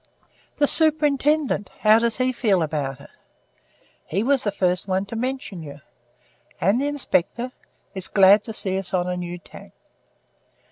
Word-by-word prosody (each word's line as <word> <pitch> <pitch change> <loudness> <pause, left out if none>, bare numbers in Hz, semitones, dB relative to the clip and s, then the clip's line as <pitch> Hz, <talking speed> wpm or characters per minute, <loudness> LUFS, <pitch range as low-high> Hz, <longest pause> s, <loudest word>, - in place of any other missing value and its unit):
"The 290 - +4
Superintendent 295 - +2
how 215 +1 +6
does 230 -1 -1
he 255 0 +1
feel 205 -8 +1
about 145 -4 -3
it?" - - -14 1.0
"He 195 +6 -1
was 270 +1 +2
the 205 - 0
first 180 -1 0
one 190 +1 0
to 200 - -7
mention 250 -6 -4
you." 145 -2 -10 0.8
"And 200 +8 +2
the 285 - 0
Inspector?" 255 -3 -1 0.4
"Is 190 -2 -4
glad 200 +1 +5
to 225 - -6
see 190 -2 0
us 195 0 -3
on 180 -1 0
a 180 - -2
new 175 0 -5
tack." 170 - -14
205 Hz, 155 wpm, -23 LUFS, 180-255 Hz, 1.0 s, how